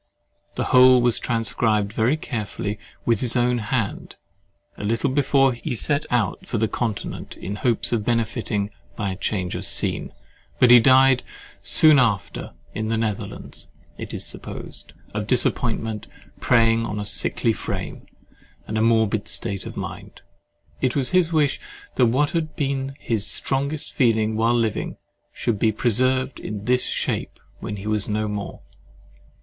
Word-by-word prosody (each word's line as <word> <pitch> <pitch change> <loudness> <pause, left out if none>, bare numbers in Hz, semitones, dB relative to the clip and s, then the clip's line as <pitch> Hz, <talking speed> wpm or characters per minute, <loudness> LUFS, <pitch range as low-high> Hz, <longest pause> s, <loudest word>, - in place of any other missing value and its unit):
The - - -1
whole 130 0 +8
was 120 -1 +2
transcribed 110 -3 0
very 120 +7 +2
carefully 105 -6 -4 0.3
with 115 -3 +2
his 120 -1 +1
own 125 0 +2
hand, 110 -1 -3 0.6
a - - -8
little 115 +6 0
before 135 -1 +3
he 120 +1 -4
set 145 +6 0
out 115 -6 -1
for - - -1
the 110 +1 +1
Continent 110 -2 -4
in 100 +2 -5
hopes 120 -1 0
of 115 -3 0
benefiting 110 -2 -1 0.2
by 100 -2 -2
a - - -4
change 90 -1 -2
of - - -4
scene, - - -1 0.5
but 125 -1 +5
he 125 - +10
died 130 +1 +5 0.4
soon 155 -3 +6
after 105 -6 -1 0.2
in 110 +1 -3
the 115 +1 0
Netherlands—it 110 -3 -6
is - - -4
supposed, - - -7 0.2
of 105 0 -3
disappointment 115 -3 0 0.3
preying 115 -2 +3
on 105 -2 -3
a 105 - -3
sickly 105 +3 +1
frame - - -5 0.6
and 110 0 -1
morbid 110 -2 +2
state 100 -1 -2
of - - -8
mind. - - -7 0.6
It 130 -2 +1
was 135 -3 +1
his 180 -2 +3
wish 150 -4 +2 0.3
that 125 - +4
what 140 +5 +2
had 160 -2 -2
been 135 -1 -2
his 110 -4 -1
strongest 140 +3 -1
feeling 110 -3 +2
while 115 +2 +2
living, 115 -3 -1 0.3
should 110 -4 -2
be 110 - +3
preserved 130 +4 +1
in 105 -1 -6
this 125 +1 +2
shape - - -2 0.2
when 105 - -5
he 100 0 -8
was 105 -1 -1
no 105 0 0
more. 105 -1 -5
115 Hz, 150 wpm, -23 LUFS, 105-130 Hz, 0.6 s, he